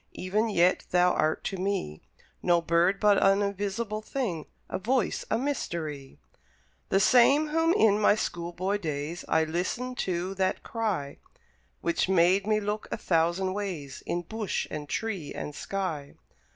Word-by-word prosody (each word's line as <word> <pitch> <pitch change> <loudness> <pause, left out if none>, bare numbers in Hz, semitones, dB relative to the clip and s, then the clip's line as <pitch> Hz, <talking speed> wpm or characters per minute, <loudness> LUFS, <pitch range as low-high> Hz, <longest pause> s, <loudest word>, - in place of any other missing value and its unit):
Even 210 +5 0
yet 180 -2 +3
thou 180 0 +4
art 155 +1 0
to 195 - -3
me 185 - -2 0.4
No 175 -1 +3
bird, 170 +3 +2
but 205 -2 +4
an 195 +1 +4
invisible 205 +2 -2
thing, 215 - -3 0.2
A 185 - -3
voice, 240 +2 0
a 220 - +2
mystery; 160 - -4 0.7
The 195 - +3
same 265 +8 +5
whom 325 +2 +2
in 210 - +4
my 205 - +5
school 175 -5 -3
boy 190 +4 -1
days 155 0 -4
I 160 - +3
listened 185 +10 -3
to; 180 +1 -1
that 190 -1 -1
Cry 200 -12 -3 0.6
Which 170 +2 0
made 190 +2 +4
me 215 0 +3
look 210 +1 -3
a - - -1
thousand 175 +3 +1
ways 175 -9 -5
In 175 0 -1
bush, 215 +2 -3
and 150 -1 -5
tree, 200 -9 -3
and 150 - -5
sky. 160 -5 -4
190 Hz, 150 wpm, -28 LUFS, 170-215 Hz, 0.7 s, same